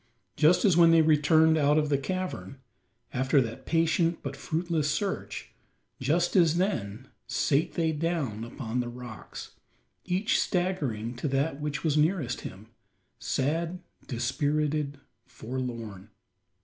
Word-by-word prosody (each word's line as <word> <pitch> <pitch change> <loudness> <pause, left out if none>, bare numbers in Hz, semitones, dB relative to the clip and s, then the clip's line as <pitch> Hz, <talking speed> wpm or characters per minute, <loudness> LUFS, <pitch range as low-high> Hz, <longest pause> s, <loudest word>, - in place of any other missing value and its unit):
Just 165 +7 +4
as 190 -5 +5
when 170 -1 +7
they 165 -1 +6
returned 160 +1 +4
out 145 +1 +3
of 150 -1 +1
the 140 - +3
cavern 185 -3 -4 0.6
after 130 +3 +3
that 115 +1 -3
patient 165 +1 +1
but - - -4
fruitless 160 -2 -1
search 150 - -3 0.5
just 165 +7 +1
as 170 -3 +4
then, 110 - -2 0.2
sate 140 - +1
they 165 -2 +1
down 150 -9 -2
upon 115 0 -4
the 120 -1 -2
rocks 120 -2 -9 0.5
each 190 +4 +1
staggering 140 - -1
to 135 - -2
that 140 +2 -1
which 150 0 -3
was 155 -2 +1
nearest 150 -5 +1
him 100 +4 -9 0.5
sad, 165 +6 -1 0.3
dispirited, 145 +3 -1 0.3
forlorn. 115 -5 -6
150 Hz, 125 wpm, -28 LUFS, 125-165 Hz, 0.6 s, when